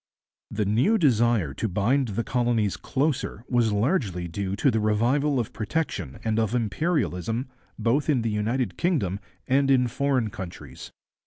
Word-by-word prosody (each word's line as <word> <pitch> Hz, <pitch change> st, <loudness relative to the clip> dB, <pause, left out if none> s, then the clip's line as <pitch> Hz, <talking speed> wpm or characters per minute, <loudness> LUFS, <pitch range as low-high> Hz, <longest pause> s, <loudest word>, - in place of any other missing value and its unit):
The 105 Hz, 0 st, -1 dB
new 125 Hz, -, +3 dB
desire 120 Hz, -, +2 dB
to 110 Hz, -, -2 dB
bind 120 Hz, +8 st, +1 dB
the 115 Hz, -, +1 dB
colonies 120 Hz, -5 st, 0 dB
closer 135 Hz, -5 st, -2 dB
was 120 Hz, -3 st, +2 dB
largely 105 Hz, -, 0 dB
due 95 Hz, +3 st, -3 dB
to -, -, +2 dB
the 110 Hz, -, +1 dB
revival 125 Hz, +7 st, +2 dB
of 115 Hz, -, -3 dB
protection 105 Hz, -, -3 dB
and 110 Hz, 0 st, 0 dB
of 110 Hz, +1 st, 0 dB
imperialism 115 Hz, -, -1 dB, 0.3 s
both 135 Hz, +6 st, +1 dB
in 130 Hz, -6 st, +2 dB
the 115 Hz, -, 0 dB
United 110 Hz, +1 st, -1 dB
Kingdom 135 Hz, -, 0 dB, 0.3 s
and 135 Hz, +1 st, +3 dB
in 125 Hz, -2 st, +4 dB
foreign 125 Hz, -3 st, 0 dB
countries. 85 Hz, -, -9 dB
115 Hz, 150 wpm, -25 LUFS, 105-135 Hz, 0.3 s, in